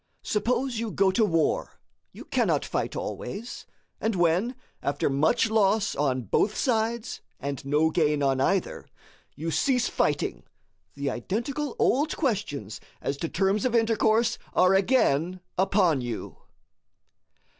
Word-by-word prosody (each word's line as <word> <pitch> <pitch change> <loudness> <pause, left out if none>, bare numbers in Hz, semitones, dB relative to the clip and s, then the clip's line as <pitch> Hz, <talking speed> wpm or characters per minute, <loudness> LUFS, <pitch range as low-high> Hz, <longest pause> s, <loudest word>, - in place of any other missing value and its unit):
Suppose 240 +3 0
you 230 -1 -2
go 195 -1 +2
to 220 +4 +2
war, 165 -6 0 0.3
you - - -11
cannot - - +1
fight - - -2
always; 210 - -6 0.3
and 220 -2 -1
when, 180 +8 +2 0.3
after 140 0 0
much 150 +10 +2
loss 210 0 +2
on 130 -3 0
both 200 - +1
sides, 230 -1 -1 0.2
an 140 -1 -4
no 150 +3 +2
gain 150 -3 +1
on 135 -1 +2
either, 190 +6 0 0.5
you 165 +2 -3
cease 250 - +2
fighting, - - 0 0.5
the 140 -1 -2
identical 235 - -3
old 290 +5 +1
questions 165 - -2 0.2
as 140 - -2
to 165 - -3
terms 195 +3 +1
of 250 -2 +1
intercourse 225 0 +2 0.2
are 185 +1 +5
again 185 - +2 0.2
upon 190 -7 +3
you. 120 -2 -5
195 Hz, 130 wpm, -26 LUFS, 150-225 Hz, 0.5 s, are